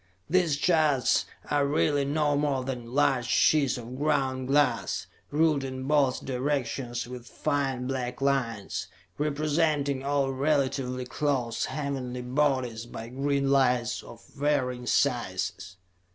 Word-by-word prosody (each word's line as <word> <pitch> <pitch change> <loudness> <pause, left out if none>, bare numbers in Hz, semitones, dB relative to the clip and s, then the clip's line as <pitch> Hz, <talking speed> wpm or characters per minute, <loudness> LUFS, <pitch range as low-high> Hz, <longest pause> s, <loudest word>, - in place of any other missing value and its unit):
These 170 -3 +2
charts 155 -5 +3 0.2
are 145 -1 +3
really 145 -1 +2
no 145 0 +1
more 140 -2 0
than 125 -3 -5
large 130 -3 +2
sheets 140 +1 +3
of 125 +2 -8
ground 135 -3 0
glass, 135 -4 +1 0.2
ruled 150 -2 +2
in 130 -1 -5
both 140 -2 +2
directions 125 -2 -2
with 125 -1 -9
fine 135 -3 -1
black 125 -2 -3
lines, 125 -10 -1 0.3
representing 150 -2 +1
all 140 -1 +1
relatively 135 -2 0
close 125 -4 -1
heavenly 130 -4 -4
bodies 125 -4 0
by 115 -1 -8
green 140 +1 0
lights 125 -3 +2
of 115 - -13
varying 130 -4 -1
sizes. 95 -9 0
135 Hz, 120 wpm, -28 LUFS, 125-145 Hz, 0.3 s, charts